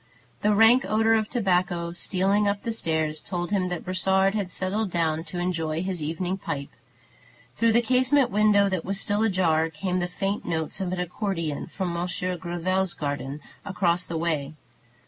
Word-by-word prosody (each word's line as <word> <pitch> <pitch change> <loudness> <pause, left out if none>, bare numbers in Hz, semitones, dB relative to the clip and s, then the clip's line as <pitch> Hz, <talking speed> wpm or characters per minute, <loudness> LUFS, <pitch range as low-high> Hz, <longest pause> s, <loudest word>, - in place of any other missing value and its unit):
The 210 0 +3
rank 225 +5 +6
odor 220 +1 +3
of 220 -1 +1
tobacco, 180 -6 0
stealing 195 +4 +1
up 200 0 -1
the 230 - -2
stairs, 160 -7 -1
told 175 0 -4
him 185 -3 +1
that 180 -1 -4
Brossard 190 +1 +2
had 205 -4 -2
settled 190 +4 -2
down 160 -2 0
to 175 +2 -7
enjoy 165 -2 -1
his 185 -3 -3
evening 175 +5 -2
pipe. 140 -5 -4 0.9
Through 230 -1 +3
the 235 +1 +4
casement 255 +2 +3
window 205 -1 +4
that 185 -4 -1
was 195 +1 -2
still 205 +1 0
ajar 175 -7 +2
came 180 +4 -2
the 175 - -1
faint 195 +3 -2
notes 160 +3 -3
of 185 -2 -2
an 185 - -2
accordeon 180 -4 -3
from 185 -3 -3
Monsieur 180 +1 -2
Gréville's 175 +2 -1
garden, 140 -1 -4 0.2
across 180 -2 0
the 165 - -3
way. 155 -3 -1
185 Hz, 170 wpm, -26 LUFS, 170-200 Hz, 0.9 s, rank